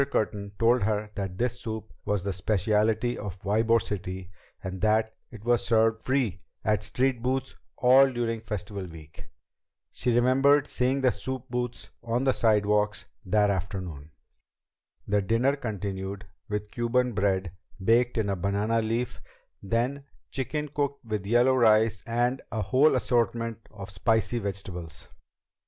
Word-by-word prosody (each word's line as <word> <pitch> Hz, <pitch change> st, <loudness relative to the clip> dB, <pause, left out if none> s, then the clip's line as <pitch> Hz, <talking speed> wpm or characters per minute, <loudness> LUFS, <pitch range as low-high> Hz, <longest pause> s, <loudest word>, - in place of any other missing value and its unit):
Curtin 100 Hz, -2 st, -1 dB
told 120 Hz, +1 st, +4 dB
her 105 Hz, 0 st, -1 dB
that 95 Hz, -3 st, -4 dB
this 125 Hz, +1 st, -1 dB
soup 110 Hz, -1 st, -6 dB
was 105 Hz, -3 st, 0 dB
the 100 Hz, -1 st, -2 dB
speciality 110 Hz, +5 st, +1 dB
of 100 Hz, -3 st, -6 dB
Ybor 110 Hz, +3 st, +3 dB
City 95 Hz, -3 st, -5 dB, 0.3 s
and 95 Hz, 0 st, -5 dB
that 110 Hz, +1 st, +2 dB, 0.2 s
it 110 Hz, -2 st, -12 dB
was 120 Hz, -1 st, +3 dB
served 115 Hz, 0 st, +2 dB
free 125 Hz, -9 st, 0 dB, 0.2 s
at 105 Hz, -1 st, +2 dB
street 125 Hz, +3 st, 0 dB
booths 130 Hz, +2 st, -1 dB, 0.2 s
all 130 Hz, +2 st, +6 dB
during 115 Hz, -2 st, -1 dB
Festival 105 Hz, -3 st, -5 dB
Week. 80 Hz, -2 st, -12 dB, 0.6 s
She 125 Hz, -, -1 dB
remembered 135 Hz, +4 st, +4 dB
seeing 130 Hz, +1 st, 0 dB
the 130 Hz, -1 st, +4 dB
soup 125 Hz, +5 st, -5 dB
booths 125 Hz, -1 st, -3 dB
on 120 Hz, +2 st, -1 dB
the 135 Hz, -1 st, +3 dB
sidewalks 105 Hz, -1 st, +2 dB, 0.2 s
that 105 Hz, +2 st, +3 dB
afternoon. 90 Hz, -6 st, -4 dB, 1.0 s
The 105 Hz, 0 st, +2 dB
dinner 115 Hz, +8 st, +2 dB
continued 100 Hz, -4 st, -4 dB, 0.2 s
with 105 Hz, 0 st, -3 dB
Cuban 125 Hz, +1 st, +1 dB
bread 95 Hz, -3 st, 0 dB, 0.3 s
baked 120 Hz, +4 st, +3 dB
in 110 Hz, -2 st, +1 dB
a 100 Hz, -, 0 dB
banana 100 Hz, +5 st, 0 dB
leaf; 115 Hz, +2 st, -2 dB, 0.4 s
then 120 Hz, +7 st, -1 dB, 0.3 s
chicken 150 Hz, +3 st, -3 dB
cooked 140 Hz, -2 st, -2 dB
with 105 Hz, -3 st, -3 dB
yellow 120 Hz, +4 st, +4 dB
rice 110 Hz, -4 st, +4 dB
and 120 Hz, +3 st, 0 dB
a 110 Hz, -2 st, -1 dB
whole 130 Hz, +10 st, +4 dB
assortment 115 Hz, -2 st, 0 dB
of 100 Hz, -2 st, -9 dB
spicy 110 Hz, +5 st, +1 dB
vegetables. 90 Hz, -7 st, -6 dB
110 Hz, 140 wpm, -27 LUFS, 100-120 Hz, 1.0 s, all